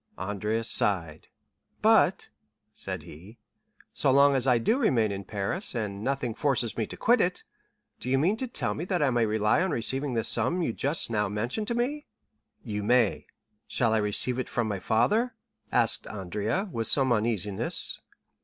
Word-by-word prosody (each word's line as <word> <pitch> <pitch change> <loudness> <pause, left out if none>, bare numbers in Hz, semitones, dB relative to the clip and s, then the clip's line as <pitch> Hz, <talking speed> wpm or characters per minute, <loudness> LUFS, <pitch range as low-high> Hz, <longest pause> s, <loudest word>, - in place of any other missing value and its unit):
'" - - -40
Andrea 105 +4 -2
sighed. 85 -8 0 0.6
"But," - - +3 0.4
said - - -4
he, 95 +10 -13 0.6
"so - - +1
long 140 +1 +5
as 135 -1 0
I 125 -2 +4
do 225 - +1
remain 115 - +2
in 100 0 -5
Paris, 105 - -2
and 105 -3 -4
nothing 135 -3 -2
forces 125 -3 -1
me 110 - -2
to - - -9
quit 240 0 +3
it, 180 0 -1 0.6
do 125 - -6
you 135 - +2
mean 175 +10 +2
to 260 - -3
tell 245 - -2
me 160 - -5
that 180 -4 0
I 135 - +2
may 120 -2 +1
rely 105 +7 +1
on 190 - 0
receiving 135 0 0
the 115 - 0
sum 130 +13 +2
you 115 - -1
just 140 -1 0
now 105 -2 0
mentioned 120 - -3
to 235 - -1
me?" 285 +5 -2 0.6
"You 105 -4 -4
may." 120 +1 +1 0.4
"Shall 115 -3 0
I - - +3
receive 110 +4 +1
it 130 - -4
from 120 -2 -1
my 100 -3 -3
father?" 215 - +1 0.4
asked - - +2
Andrea, 105 - -3
with 115 -4 -2
some 130 -3 +4
uneasiness. 105 -3 0
120 Hz, 180 wpm, -27 LUFS, 105-145 Hz, 0.6 s, long